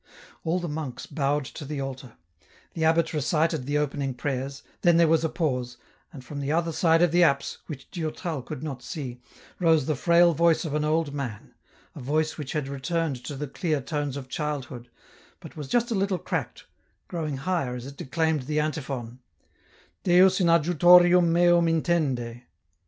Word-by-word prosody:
All 165 Hz, +2 st, 0 dB
the 175 Hz, -, -4 dB
monks 150 Hz, -5 st, -5 dB
bowed 145 Hz, -1 st, -1 dB
to 150 Hz, -, -8 dB
the 145 Hz, 0 st, -5 dB
altar; 135 Hz, -3 st, -6 dB, 0.6 s
the 165 Hz, -, -2 dB
abbot 165 Hz, +1 st, +2 dB
recited 155 Hz, -1 st, 0 dB
the 145 Hz, +1 st, +1 dB
opening 140 Hz, -2 st, -2 dB
prayers, 135 Hz, 0 st, -4 dB, 0.2 s
then 175 Hz, -2 st, +5 dB
there 170 Hz, -1 st, +5 dB
was 160 Hz, 0 st, +3 dB
a 160 Hz, -, +1 dB
pause, 125 Hz, -7 st, -2 dB, 0.3 s
and, 130 Hz, -3 st, -11 dB
from 145 Hz, +1 st, -6 dB
the 140 Hz, +1 st, -2 dB
other 165 Hz, +1 st, +1 dB
side 165 Hz, +1 st, +3 dB
of 175 Hz, -, +3 dB
the 175 Hz, +1 st, +4 dB
apse, 140 Hz, -5 st, +2 dB
which 140 Hz, -5 st, -8 dB
Durtal 160 Hz, -2 st, -4 dB
could 130 Hz, +2 st, -7 dB
not 135 Hz, -5 st, -5 dB
see, 125 Hz, -3 st, -6 dB, 0.4 s
rose 160 Hz, -5 st, +3 dB
the 155 Hz, -, 0 dB
frail 170 Hz, +4 st, +4 dB
voice 170 Hz, +2 st, +2 dB
of 150 Hz, -, -4 dB
an 150 Hz, 0 st, 0 dB
old 155 Hz, -1 st, 0 dB
man, 125 Hz, -8 st, -6 dB, 0.4 s
a -, -, -8 dB
voice 155 Hz, +4 st, 0 dB
which 145 Hz, -3 st, -6 dB
had 150 Hz, -3 st, -2 dB
returned 140 Hz, -1 st, -2 dB
to 145 Hz, -, -5 dB
the 145 Hz, +2 st, -4 dB
clear 155 Hz, +2 st, -1 dB
tones 145 Hz, 0 st, -3 dB
of 135 Hz, -2 st, -7 dB
childhood, 135 Hz, -4 st, -5 dB, 0.5 s
but -, -, -12 dB
was 150 Hz, -3 st, -6 dB
just 240 Hz, -, +1 dB
a -, -, +2 dB
little 195 Hz, -2 st, 0 dB
cracked, -, -, -4 dB, 0.4 s
growing 155 Hz, -5 st, -3 dB
higher 140 Hz, -4 st, -1 dB
as 125 Hz, 0 st, -7 dB
it 140 Hz, +1 st, -9 dB
declaimed 160 Hz, -2 st, -1 dB
the 150 Hz, 0 st, 0 dB
antiphon, 135 Hz, -6 st, -4 dB, 0.8 s
Deus 185 Hz, +1 st, +5 dB
in 175 Hz, -, +3 dB
adjutorium 175 Hz, +1 st, +6 dB
meum 175 Hz, 0 st, +4 dB
intende." 145 Hz, -8 st, 0 dB
150 Hz, 180 wpm, -26 LUFS, 135-170 Hz, 0.8 s, adjutorium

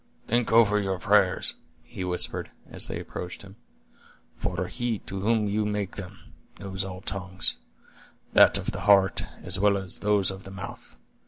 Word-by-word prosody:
"Think 120 Hz, 0 st, +1 dB
over 110 Hz, -2 st, +5 dB
your 95 Hz, -2 st, -1 dB
prayers," 95 Hz, 0 st, +3 dB, 0.3 s
he 95 Hz, +1 st, -7 dB
whispered, 90 Hz, -1 st, -1 dB, 0.2 s
as -, -, +1 dB
they -, -, -4 dB
approached 90 Hz, +2 st, -7 dB
him; 100 Hz, 0 st, -13 dB, 0.8 s
"for 90 Hz, +2 st, -2 dB
He 120 Hz, +4 st, -2 dB
to 95 Hz, -, -5 dB
whom 110 Hz, 0 st, +2 dB
you 105 Hz, +1 st, 0 dB
make 105 Hz, -2 st, -2 dB
them, 95 Hz, -1 st, -8 dB, 0.4 s
knows 95 Hz, 0 st, -3 dB
all 95 Hz, -1 st, -7 dB
tongues; 95 Hz, -1 st, -1 dB, 0.8 s
that -, -, +7 dB
of -, -, -3 dB
the -, -, -6 dB
heart, 95 Hz, -2 st, +5 dB, 0.2 s
as -, -, +1 dB
well 100 Hz, 0 st, +4 dB
as 95 Hz, -2 st, -6 dB
those 105 Hz, -2 st, +2 dB
of 95 Hz, 0 st, -9 dB
the -, -, -10 dB
mouth. 95 Hz, -9 st, -9 dB
95 Hz, 165 wpm, -27 LUFS, 95-105 Hz, 0.8 s, that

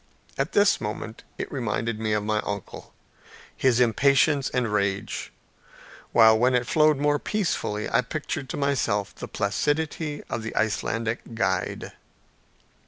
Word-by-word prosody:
At 135 Hz, +3 st, -2 dB
this 205 Hz, 0 st, +4 dB
moment 110 Hz, +1 st, -5 dB, 0.2 s
it -, -, -5 dB
reminded 115 Hz, -3 st, -2 dB
me 110 Hz, -1 st, 0 dB
of 105 Hz, -1 st, 0 dB
my 105 Hz, 0 st, 0 dB
uncle, 100 Hz, -2 st, -6 dB, 0.6 s
his 125 Hz, -2 st, +2 dB
impatience 140 Hz, +4 st, +3 dB
and 120 Hz, -4 st, -1 dB
rage, 100 Hz, +1 st, -1 dB, 0.8 s
while 110 Hz, -1 st, +7 dB
when 125 Hz, +2 st, +3 dB
it 125 Hz, 0 st, +1 dB
flowed 155 Hz, +2 st, +4 dB
more 145 Hz, +1 st, +2 dB
peacefully, 160 Hz, -, -1 dB
I -, -, +2 dB
pictured 145 Hz, +1 st, -4 dB
to -, -, -4 dB
myself 120 Hz, -8 st, 0 dB
the -, -, -8 dB
placidity 145 Hz, +8 st, -1 dB
of 115 Hz, -, -3 dB
the 110 Hz, -, -6 dB
Icelandic 115 Hz, +2 st, -1 dB
guide. -, -, -1 dB
120 Hz, 135 wpm, -25 LUFS, 110-145 Hz, 0.8 s, while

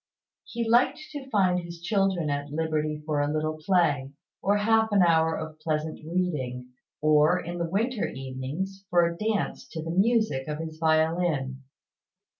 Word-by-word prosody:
He 235 Hz, -1 st, -3 dB
liked 240 Hz, +2 st, +4 dB
to 280 Hz, -3 st, -7 dB
find 185 Hz, -6 st, +3 dB
his 170 Hz, -1 st, -8 dB
children 190 Hz, -4 st, +1 dB
at 145 Hz, 0 st, -3 dB
liberty 155 Hz, -1 st, -1 dB
for 150 Hz, -2 st, 0 dB
a 145 Hz, 0 st, 0 dB
little 155 Hz, 0 st, -2 dB
play, 150 Hz, -8 st, +2 dB, 0.3 s
or 200 Hz, +1 st, +2 dB
half 220 Hz, +1 st, +3 dB
an 200 Hz, -3 st, +5 dB
hour 160 Hz, -1 st, +3 dB
of 155 Hz, 0 st, -7 dB
pleasant 155 Hz, 0 st, -2 dB
reading; 150 Hz, -8 st, -2 dB, 0.3 s
or, 155 Hz, +3 st, +4 dB
in 175 Hz, 0 st, -5 dB
the 170 Hz, -1 st, -1 dB
winter 225 Hz, +5 st, 0 dB
evenings, 135 Hz, +9 st, -5 dB
for 175 Hz, -2 st, +4 dB
a 170 Hz, 0 st, -2 dB
dance 215 Hz, +2 st, -2 dB
to 160 Hz, -2 st, -6 dB
the 165 Hz, -, -4 dB
music 205 Hz, -, +2 dB
of 150 Hz, -1 st, -3 dB
his 160 Hz, 0 st, -7 dB
violin. 160 Hz, -4 st, +1 dB
165 Hz, 160 wpm, -27 LUFS, 150-195 Hz, 0.3 s, an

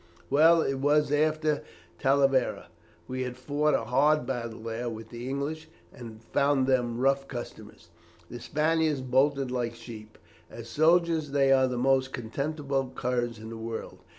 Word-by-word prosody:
"Well 160 Hz, +3 st, +5 dB
it 135 Hz, -1 st, -2 dB
was 145 Hz, +1 st, +2 dB
after 155 Hz, 0 st, +1 dB, 0.4 s
Talavera. 135 Hz, -1 st, +2 dB, 0.4 s
We 130 Hz, 0 st, -4 dB
had 125 Hz, -1 st, -4 dB
fought 150 Hz, +3 st, 0 dB
a -, -, -1 dB
hard 150 Hz, +5 st, +2 dB
battle 115 Hz, -4 st, -4 dB
there 115 Hz, +2 st, -4 dB
with 110 Hz, -1 st, -8 dB
the 120 Hz, +2 st, -7 dB
English, 150 Hz, +4 st, -4 dB, 0.3 s
and 115 Hz, -2 st, -11 dB
found 140 Hz, +1 st, +1 dB
them 125 Hz, -3 st, +1 dB
rough 135 Hz, +1 st, +1 dB
customers. 120 Hz, -2 st, -9 dB, 0.4 s
The 120 Hz, -, -8 dB
Spaniards 155 Hz, +2 st, 0 dB
bolted 135 Hz, +1 st, +1 dB
like 120 Hz, -2 st, -2 dB
sheep. 110 Hz, -2 st, -11 dB, 0.3 s
As 115 Hz, 0 st, -10 dB
soldiers, 160 Hz, +2 st, +2 dB
they 140 Hz, -1 st, +3 dB
are 130 Hz, -1 st, +5 dB
the 125 Hz, -1 st, -3 dB
most 130 Hz, +1 st, +2 dB
contemptible 135 Hz, +2 st, -3 dB
curs 120 Hz, -2 st, -2 dB
in 110 Hz, +1 st, -9 dB
the 115 Hz, -, -7 dB
world. 110 Hz, -4 st, -6 dB
135 Hz, 150 wpm, -28 LUFS, 120-145 Hz, 0.4 s, Well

